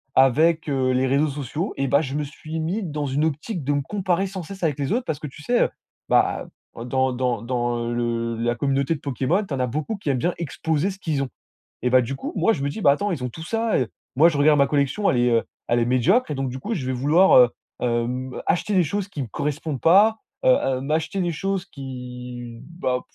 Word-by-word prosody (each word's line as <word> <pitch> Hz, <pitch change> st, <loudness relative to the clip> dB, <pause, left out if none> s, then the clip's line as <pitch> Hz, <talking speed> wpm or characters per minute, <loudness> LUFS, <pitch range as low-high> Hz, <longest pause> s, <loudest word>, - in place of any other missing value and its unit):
avec, 155 Hz, +5 st, +4 dB
heu, 130 Hz, -2 st, +1 dB
les 130 Hz, +1 st, +2 dB
réseaux 140 Hz, +4 st, +2 dB
sociaux 145 Hz, -, -4 dB
et 135 Hz, 0 st, 0 dB
bah, 140 Hz, +3 st, +4 dB
je 135 Hz, -2 st, -4 dB
me 150 Hz, -, 0 dB
suis 155 Hz, +2 st, -7 dB
mis 185 Hz, +7 st, -2 dB
dans 150 Hz, -3 st, -3 dB
une 140 Hz, +3 st, 0 dB
optique 160 Hz, +3 st, -3 dB
de 145 Hz, -, 0 dB
me 145 Hz, -, +1 dB
comparer 190 Hz, +2 st, -1 dB
sans 190 Hz, -2 st, -6 dB
cesse 190 Hz, +2 st, -9 dB
avec 150 Hz, -4 st, +1 dB
les 140 Hz, -, -1 dB
autres, 245 Hz, +1 st, 0 dB
parce 155 Hz, -2 st, -3 dB
que 150 Hz, -, -5 dB
tu 145 Hz, +2 st, -12 dB
sais, 245 Hz, +5 st, +2 dB
heu? -, -, +1 dB, 0.4 s
Bah, -, -, +2 dB, 0.4 s
dans 130 Hz, 0 st, +1 dB
dans 125 Hz, -3 st, -1 dB
dans 120 Hz, -1 st, -1 dB
le 115 Hz, -1 st, -1 dB
la 120 Hz, +1 st, 0 dB
communauté 140 Hz, +4 st, 0 dB
de -, -, -9 dB
Pokémon, 140 Hz, -, 0 dB
tu 150 Hz, -, -6 dB
en 130 Hz, -, -2 dB
as 125 Hz, -, +1 dB
beaucoup 155 Hz, -, -3 dB
qui 155 Hz, -, -4 dB
aiment 130 Hz, -, +2 dB
bien 175 Hz, +5 st, 0 dB
exposer 160 Hz, +2 st, -1 dB
ce 190 Hz, -, -10 dB
qu'ils 150 Hz, -6 st, -1 dB
ont 130 Hz, -, -5 dB, 0.5 s
et 125 Hz, -, +2 dB
bah, 130 Hz, 0 st, +5 dB
du 135 Hz, +4 st, -3 dB
coup, -, -, -5 dB
moi 185 Hz, +6 st, +3 dB
je 140 Hz, -, -5 dB
me -, -, 0 dB
dis: 220 Hz, -, -6 dB
«Ben, 140 Hz, -, +6 dB
attends, 205 Hz, +8 st, -1 dB
ils 130 Hz, -6 st, -3 dB
ont 125 Hz, -, -2 dB
tout 160 Hz, -, -9 dB
ça» 225 Hz, +3 st, 0 dB
et, 125 Hz, -, 0 dB, 0.3 s
moi 160 Hz, +4 st, +7 dB
je 150 Hz, -, -3 dB
regarde 150 Hz, 0 st, +5 dB
ma 140 Hz, -, +5 dB
collection, 145 Hz, +8 st, +1 dB
elle -, -, +1 dB
est, 120 Hz, 0 st, +3 dB
heu, 115 Hz, -1 st, +2 dB, 0.2 s
elle 120 Hz, 0 st, +2 dB
est 115 Hz, -, +1 dB
médiocre 155 Hz, -, +3 dB
et -, -, -1 dB
donc 135 Hz, -2 st, -2 dB
du 130 Hz, -, -6 dB
coup, 225 Hz, +7 st, -3 dB
je 140 Hz, -9 st, -3 dB
vais 130 Hz, -, -1 dB
vouloir, 150 Hz, +9 st, +4 dB
heu, 120 Hz, -1 st, +7 dB, 0.3 s
hem, 125 Hz, +2 st, -1 dB
acheter 185 Hz, +4 st, +1 dB
des 185 Hz, -, +5 dB
choses 200 Hz, +5 st, -2 dB
qui 150 Hz, -8 st, -5 dB
me 125 Hz, -, -6 dB
correspondent 150 Hz, +4 st, -3 dB
pas, 210 Hz, +6 st, +5 dB, 0.3 s
heu, -, -, +6 dB, 0.3 s
heu, -, -, -4 dB
m'acheter 160 Hz, +6 st, -1 dB
des 175 Hz, -1 st, 0 dB
choses 195 Hz, +2 st, -2 dB
qui, 125 Hz, -4 st, -8 dB
bah, 130 Hz, -7 st, -2 dB
145 Hz, 250 wpm, -23 LUFS, 130-170 Hz, 0.5 s, moi